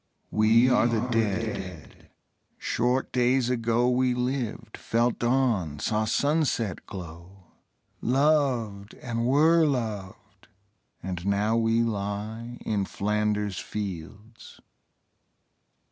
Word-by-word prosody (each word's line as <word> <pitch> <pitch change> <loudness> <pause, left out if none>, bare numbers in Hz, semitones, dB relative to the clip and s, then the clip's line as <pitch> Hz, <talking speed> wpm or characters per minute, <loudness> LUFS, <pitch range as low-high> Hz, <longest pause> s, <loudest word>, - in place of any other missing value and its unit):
We 110 +3 +4
are 125 -2 +4
the 115 +1 0
Dead. 105 -6 -3 0.5
Short 125 +3 0
days 125 0 +2
ago 115 0 +1
We 125 0 +2
lived, 125 -3 -3
felt 115 +1 0
dawn, 120 - +1
saw 110 +7 0
sunset 135 - 0
glow, 90 +1 -10 0.6
Loved, 125 -7 +1
and 115 -1 -3
were 160 +5 +5
loved, 110 -8 -5 0.6
and 90 -2 -4
now 105 +3 +1
we 115 0 +2
lie 110 +2 -4
In 105 -2 0
Flanders 105 -1 -1
fields. 105 +2 -7
115 Hz, 95 wpm, -26 LUFS, 100-125 Hz, 0.6 s, were